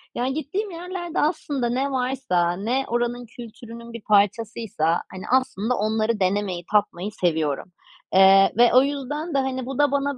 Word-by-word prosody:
Yani 255 +2 -1
gittiğim 375 +8 -3
yerlerde 350 0 -5
aslında 290 -5 -1
ne 265 +3 -1
varsa, 250 -10 0
ne 235 +9 -1
oranın 240 +1 -2
kültürünün 235 0 -11
bir 230 - -7
parçasıysa, 205 -4 +1
hani, 185 0 -8
aslında 250 -3 +1
onları 215 +1 0
denemeyi 185 -2 -1
tatmayı 205 -2 0
seviyorum. 160 -4 -1 0.4
Eee, 195 +1 +7
ve 240 0 +5
o 255 +1 +7
yüzden 290 +3 -3
de, - - +1
hani, 260 -1 -2
bu 265 0 -5
da 290 -1 +3
bana, 280 -1 -1
240 Hz, 155 wpm, -23 LUFS, 205-270 Hz, 0.4 s, Eee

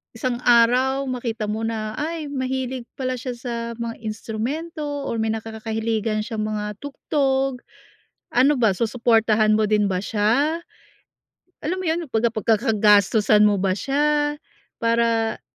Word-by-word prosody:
isang 245 +1 -2
araw 250 +3 +4
makita 230 -4 -3
mo 220 +1 -2
na, 220 -1 -3
"Ay, 315 -1 -3
mahilig 260 -2 -3
pala 255 -1 -2
siya 250 +1 -4
sa 240 0 -6 0.3
mga 230 0 -4
instrumento 265 +10 -4 0.2
or 230 - -2
may 220 0 0
nakakakahiligan 220 0 -2
siyang 215 -1 -3
mga 210 -1 -4
tugtog." 270 -2 -1 0.7
Ano 265 +4 +4
ba, 230 -4 +3
susuportahan 220 0 +2
mo 215 - +2
din 210 -1 +2
ba 185 - 0
siya? 235 - +1 1.0
Alam 350 +5 -1
mo - - -6
yun, 325 +2 +1
pagka 225 +1 +2
pag-kakagastusan 215 -1 +3
mo 210 -1 +4
ba 190 0 +1
siya, 295 +5 +1 0.4
para 230 -1 +1
230 Hz, 130 wpm, -22 LUFS, 215-265 Hz, 1.0 s, araw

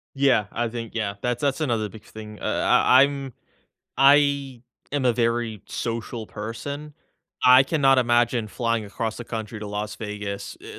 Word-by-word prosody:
Yeah, 135 -6 +3
I 120 +1 -1
think 115 0 -6
yeah. 105 -3 -2
That's 125 -1 -2
that's 140 +1 0
another 115 -7 0
big 110 +1 -13
thing. 105 -1 -10
Uh, - - -5
I 130 +2 +4
I'm 140 -2 -3 0.6
I 140 -2 +3 0.3
am 145 -2 0
a 125 - +4
very 115 -3 -1
social 115 -1 -4
person, 140 +9 -7 0.5
I 125 +1 +8
cannot 135 -2 +3
imagine 120 -2 +2
flying 115 0 -1
across 110 +2 -4
the 120 - -7
country 110 -1 -6
to 105 - -6
Las 105 +1 -4
Vegas, 105 -2 -6
eh, - - -10
120 Hz, 160 wpm, -24 LUFS, 110-135 Hz, 0.6 s, I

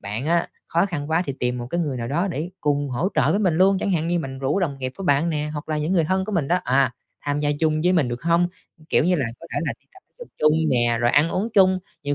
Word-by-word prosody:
bạn 105 +7 -4
á 170 +1 +1 0.2
khó 170 +4 +1
khăn 155 -4 -5
quá 165 +3 +2
thì 140 - -3
tìm 125 0 -1
một 120 - -5
cái 170 +7 -2
người 145 -6 -2
nào 115 -1 -4
đó 170 +8 0
để 165 +3 -4
cùng 145 -1 0
hỗ 145 +10 0
trợ - - +3
với 200 - +2
mình 180 -6 +2
luôn, 190 +1 +4
chẳng 200 - -1
hạn 165 -1 0
như 175 0 +1
mình 135 -4 -5
rủ 140 +8 0
đồng 140 -6 -2
nghiệp 130 -1 -4
của 195 - -6
bạn 145 +3 +2
nè, 150 -1 -2
hoặc 150 +1 -6
là 155 -1 -1
những 155 +5 -1
người 170 -4 +3
thân 190 +3 0
của 215 - -5
mình 165 -8 0
đó, 180 - +3
à, 130 0 +2 0.3
tham 145 0 -1
gia 145 0 +1
chung 155 -1 +2
với 180 +2 +3
mình 155 -8 +2
được 120 +2 -5
hông? 170 +1 +2 0.4
Kiểu - - +3
như 180 - +3
là, 135 - 0
có - - -10
thể - - +1
là - - 0
đi - - -38
tập 380 - -16 0.2
dục 485 - -10
chung 150 0 +4 0.2
nè, 120 -2 +2
rồi 120 0 +3
ăn 150 +4 +3
uống 205 +5 -1
chung, 190 -2 +5 0.2
nhiều 145 0 -1
155 Hz, 300 wpm, -23 LUFS, 135-175 Hz, 0.4 s, chung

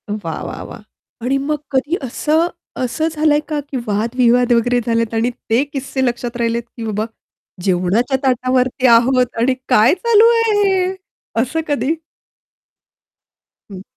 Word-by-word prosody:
वाह, 195 -7 -4
वाह, - - -6
वाह! - - -10 0.4
आणि 260 +4 0
मग 295 +2 -1
कधी 280 +5 +1
असं 310 +6 +1 0.3
असं 255 +6 -1
झालंय 305 -1 +2
का 305 -2 -2
की 270 - -3
वाद-विवाद 235 +3 +2
वगैरे 245 +1 +2
झालेत 230 -1 0
आणि 225 +2 +1 0.2
ते 230 +4 +3
किस्से 270 -1 -3
लक्षात 240 0 -3
राहिलेत, 235 0 -1
की 230 - -5
बाबा 215 0 -2 0.6
जेवणाच्या 195 +8 +1
ताटावरती 255 0 +1
आहोत 250 +2 +5
आणि 250 +3 +3 0.2
काय 245 0 +5
चालू 450 +3 +4
आहे 455 -1 +2
हे? 375 -1 +1 0.5
असं 260 +7 -2
कधी? 290 +1 0 1.8
हं. 190 -2 -9
250 Hz, 140 wpm, -18 LUFS, 230-290 Hz, 1.8 s, आहोत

